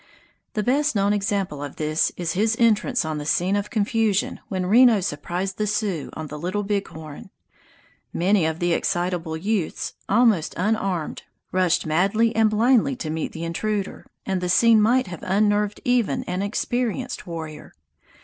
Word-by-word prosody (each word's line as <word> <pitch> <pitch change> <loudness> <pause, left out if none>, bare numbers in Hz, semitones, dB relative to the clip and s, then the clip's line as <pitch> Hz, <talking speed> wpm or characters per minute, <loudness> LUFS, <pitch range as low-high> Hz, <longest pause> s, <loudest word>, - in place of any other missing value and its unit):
The 210 - 0
best 285 +3 +1
known 200 0 +2
example 195 -7 -1
of 145 - -7
this 155 0 0
is 170 -2 -2
his 220 +4 +1
entrance 230 -1 +2
on 155 -1 -3
the - - -5
scene 185 +5 +1
of 205 0 -2
confusion 215 -2 0
when 185 -2 -2
Reno 230 +2 +6
surprised 180 +4 -3
the 210 - 0
Sioux 205 -7 -1
on 160 - -6
the 150 0 -7
Little 185 +6 -2
Big 200 0 -1
Horn. 155 +2 -10 0.8
Many 185 -1 +2
of 160 0 -2
the 175 0 +1
excitable 175 -3 -1
youths, 195 0 -2 0.2
almost 215 -6 +3
unarmed, 190 -4 -1 0.3
rushed 180 -2 +1
madly 200 +8 +2
and 220 -1 +4
blindly 245 +5 +3
to 160 -11 -5
meet 160 0 -3
the 165 - -7
intruder, 200 +4 -3 0.2
and 190 -2 -1
the 180 - -2
scene 225 +4 +5
might 245 +4 +3
have 175 -3 -8
unnerved 205 +1 +1
even 245 0 +1
an 180 -4 -3
experienced 245 +3 -2
warrior. 160 -3 -7
195 Hz, 160 wpm, -23 LUFS, 170-220 Hz, 0.8 s, Reno